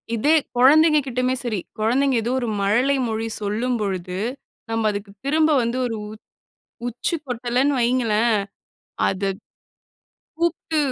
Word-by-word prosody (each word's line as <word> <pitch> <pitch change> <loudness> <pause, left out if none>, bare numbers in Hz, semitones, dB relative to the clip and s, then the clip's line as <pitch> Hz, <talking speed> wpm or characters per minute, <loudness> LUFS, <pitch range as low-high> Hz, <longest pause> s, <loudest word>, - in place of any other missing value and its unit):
இதே 295 +8 +3 0.2
குழந்தைங்க 305 +4 +6
கிட்டயுமே 255 +1 0
சரி. 215 -5 -1 0.2
குழந்தைங்க 255 +4 +2
ஏதோ 240 - -1
ஒரு 240 - -3
மழலை 245 +8 +2
மொழி 225 +1 -2
சொல்லும் 225 +5 -1
பொழுது, 185 -2 -3 0.5
நம்ம 225 -1 0
அதுக்கு 205 0 -6
திரும்ப 310 +2 +3
வந்து 235 +2 -1
ஒரு 225 -2 -2
உ - - -9 0.8
உச்சு 245 +8 -2
கொட்டலன்னு 250 +3 0
வைங்களேன். 235 -2 +2 0.7
அது, 195 +1 -1 1.1
கூப்ட்டு 330 -2 -1
240 Hz, 120 wpm, -22 LUFS, 215-275 Hz, 1.1 s, குழந்தைங்க